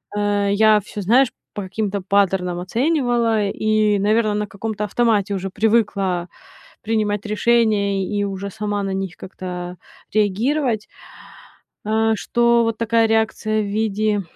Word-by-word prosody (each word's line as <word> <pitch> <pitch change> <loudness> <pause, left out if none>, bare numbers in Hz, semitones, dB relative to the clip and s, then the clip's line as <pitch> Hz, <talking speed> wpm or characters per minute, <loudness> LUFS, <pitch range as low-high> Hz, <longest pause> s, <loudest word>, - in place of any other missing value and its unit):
э, 205 -1 +1
я 215 +1 +5
всё, 205 +1 -7
знаешь, 240 +7 +4 0.2
по 205 - -4
каким-то 200 +1 -3
паттернам 185 -2 +1
оценивала 235 - +1
и, 215 -1 +1
наверно, 215 +1 +2
на 210 0 -2
каком-то 210 +1 -4
автомате 210 -3 +1
уже 195 0 -3
привыкла 200 -4 0 0.5
принимать 210 -2 -1
решения 215 -3 +2
и 205 -1 -1
уже 200 0 -4
сама 205 0 -3
на 195 - -2
них 190 -2 -4
как-то 180 -1 -7 0.4
реагировать, 220 +3 0 1.0
э, 220 +1 +2
что 235 +1 +2
вот 225 -1 -2
такая 230 0 +2
реакция 220 -1 0
в - - -3
виде 210 0 0
210 Hz, 130 wpm, -20 LUFS, 200-225 Hz, 1.0 s, я